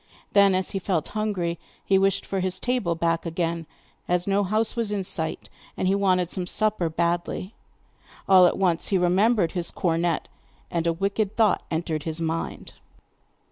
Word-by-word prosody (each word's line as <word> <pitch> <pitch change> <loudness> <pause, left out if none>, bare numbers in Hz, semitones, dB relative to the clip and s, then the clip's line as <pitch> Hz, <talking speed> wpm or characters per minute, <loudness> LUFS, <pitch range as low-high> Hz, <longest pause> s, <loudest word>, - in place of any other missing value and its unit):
Then, 200 -2 +5
as 185 -1 -1
he 195 - -2
felt 175 -4 -1
hungry, 195 -6 -2 0.3
he 195 -1 +4
wished 195 0 +1
for 195 - -2
his 185 0 -1
table 245 -7 -1
back 165 0 0
again, 165 -1 -2 0.4
as 180 0 +1
no 200 +1 +2
house 215 +3 0
was 230 -3 -1
in 200 -2 -1
sight, 160 -3 -3 0.3
and 185 - 0
he 190 - +3
wanted 185 -3 +1
some 180 -2 -3
supper 210 -4 +1
badly. 175 +4 -2 0.7
All 185 -2 +7
at - - 0
once 180 -4 +1
he 195 - +2
remembered 185 +2 +3
his 175 -3 0
cornet, 170 -1 0 0.4
and 170 -1 -1
a - - +3
wicked 200 +3 -1
thought 220 -4 +3
entered 160 -2 -2
his 160 +1 -4
mind. 165 0 -4
185 Hz, 170 wpm, -25 LUFS, 170-200 Hz, 0.7 s, All